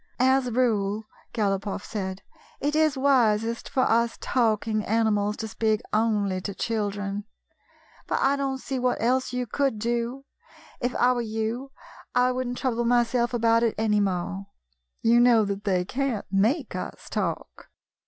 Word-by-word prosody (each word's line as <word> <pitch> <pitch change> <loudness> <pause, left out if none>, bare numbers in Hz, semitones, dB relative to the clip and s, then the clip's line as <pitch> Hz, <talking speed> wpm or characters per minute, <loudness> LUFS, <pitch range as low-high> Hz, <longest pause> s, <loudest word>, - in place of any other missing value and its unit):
" - - -38 0.2
As 265 -2 0
a - - -3
rule," 220 -3 +1 0.3
Galopoff 200 -2 -1
said, 190 -3 -5 0.2
" - - -28
it 290 +2 -1
is 310 -3 +3
wisest 235 -4 +2
for 260 - +1
us 235 0 +2
talking 220 -3 +1
animals 210 -1 +1
to 220 - -4
speak 220 -1 0
only 210 -4 +1
to 200 +1 -5
children. 205 -2 -2 0.8
But - - 0
I 275 +1 +3
don't 275 -1 -2
see 265 0 -4
what 250 0 0
else 255 +3 +1
you 250 0 -2
could 270 0 0
do. 235 +4 -2 0.5
If 245 0 -2
I 245 - +4
were 245 - -1
you, 225 +4 -3 0.4
I 250 0 +4
would 255 0 -2
n't 245 0 -4
trouble 240 -2 0
myself 240 0 +2
about 230 -1 +3
it 230 -2 +1
any 215 -1 +2
more. 195 0 -2 0.6
You 235 +1 +5
know 240 -3 +5
that 200 0 -4
they 185 -3 +1
can't 250 -1 -2
make 220 - +1
us 185 - -6
talk." - - -4
230 Hz, 165 wpm, -26 LUFS, 210-250 Hz, 0.8 s, You